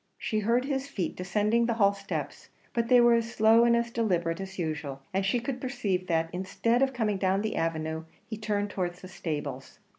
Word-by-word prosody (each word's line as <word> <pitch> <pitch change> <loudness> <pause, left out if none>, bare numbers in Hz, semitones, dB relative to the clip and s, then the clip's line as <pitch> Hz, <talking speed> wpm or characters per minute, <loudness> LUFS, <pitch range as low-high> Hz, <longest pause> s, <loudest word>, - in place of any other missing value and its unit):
She 215 - -1
heard 235 +4 +2
his 275 -1 -2
feet 195 -10 -3
descending 210 +6 +1
the 235 - 0
hall 200 -3 +4
steps; 200 +1 -5 0.2
but 235 -1 0
they 250 0 +6
were 240 0 +6
as 230 0 +1
slow 225 +2 +5
and 235 0 +5
as 235 0 -1
deliberate 180 -7 0
as 190 0 -7
usual; 150 -5 -4
and 195 +1 +1
she 195 +6 +1
could 250 +1 -4
perceive 195 -8 -2
that, 165 -1 0
instead 200 +6 0
of 270 0 +3
coming 215 -6 -1
down 190 +1 +1
the 220 - -2
avenue, 160 -1 -2 0.2
he 220 - -5
turned 205 -1 -2
towards 180 -2 -3
the 185 - -9
stables. 145 -7 -5
205 Hz, 205 wpm, -28 LUFS, 180-235 Hz, 0.2 s, they